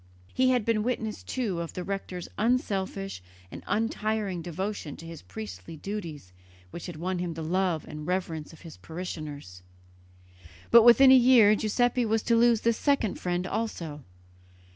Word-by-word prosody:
He 255 0 +3
had 250 -4 +2
been 225 -2 +2
witness, 225 -2 -2
too, 215 -9 -3
of 170 -1 -5
the 180 - -4
rector's 185 -2 -5
unselfish 195 - -1 0.3
and 85 - -8
untiring 215 -4 -1
devotion 175 -2 -5
to 165 - -11
his 165 -2 -9
priestly 95 - -9
duties 160 - -6 0.4
which 170 - -7
had 175 - -7
won 180 +3 -3
him 175 -2 -3
the 165 - -5
love 175 -1 0
and 150 +1 -8
reverence 170 -4 -2
of 160 - -16
his 165 -2 -11
parishioners; 155 - -7 1.1
but 235 - +9
within 245 +3 +8
a - - +9
year 240 -4 +7
Giuseppe 245 +4 +1
was 220 -1 0
to 235 - +2
lose 230 -1 +4
this 230 -1 +1
second 280 -8 +1
friend 180 0 -2
also. 170 -9 -4
190 Hz, 160 wpm, -27 LUFS, 165-225 Hz, 1.1 s, but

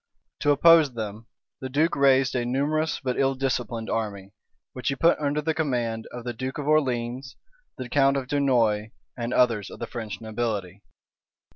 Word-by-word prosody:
To 145 - +1
oppose 150 -2 +6
them, 110 0 -6 0.3
the 130 - -5
duke 155 +5 +1
raised 135 -1 +4
a 125 - 0
numerous 145 +6 0
but 125 -2 -2
ill 135 0 +2
disciplined 125 -4 -2
army, 100 -3 -3 0.4
which 125 - -6
he 135 - +1
put 165 +5 +3
under 150 0 -1
the 160 +1 0
command 120 -8 -2
of 120 -1 -7
the 120 0 -4
duke 130 +4 -5
of 145 - -4
Orleans, 130 -3 0 0.4
the 130 - -5
count 135 +2 +3
of 130 -2 -4
Dunois, 120 -7 +1 0.3
and 120 -1 -4
others 115 -6 +2
of - - -10
the - - -4
French 110 -2 -6
nobility. 105 -4 -4
125 Hz, 170 wpm, -25 LUFS, 115-140 Hz, 0.4 s, oppose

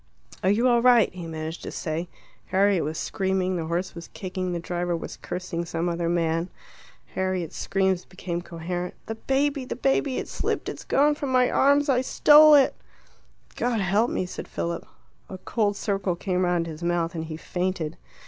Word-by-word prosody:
"Are 190 - +2
you 225 +5 +3
all 240 -1 +4
right?" 240 -5 +5
he 175 -2 -7
managed 160 0 -5
to - - -6
say. 165 +2 -3 0.4
Harriet 195 -2 +3
was 155 +2 -3
screaming, 190 -1 -1
the 165 -2 -2
horse 175 +3 -2
was 170 0 -9
kicking, 185 -1 -4
the 175 - -2
driver 175 0 -2
was - - -7
cursing 180 -2 -4
some 170 0 -2
other 170 -1 -1
man. 165 0 0 0.6
Harriet's 185 -3 -2
screams 190 -2 0
became 175 -2 -5
coherent. 175 +1 -5
"The 225 - -4
baby 275 +4 0
the 255 - -5
baby 270 +1 +1
it - - -3
slipped - - -2
it's - - -8
gone 290 +2 +3
from 285 -2 -4
my 255 -1 +3
arms 285 +2 +4
I 255 -3 +3
stole 300 +3 +7
it!" 275 -2 +5 0.8
"God 240 -2 0
help 205 +5 +2
me!" 185 - -1
said 180 - -7
Philip. 170 0 -4 0.4
A 190 - -6
cold 205 +2 -1
circle 195 -3 -1
came 185 0 -1
round 175 -1 +1
his 160 -1 -8
mouth, 170 0 0
and, 160 -1 -4
he 155 -1 -6
fainted. 175 -2 -3
185 Hz, 180 wpm, -25 LUFS, 170-225 Hz, 0.8 s, stole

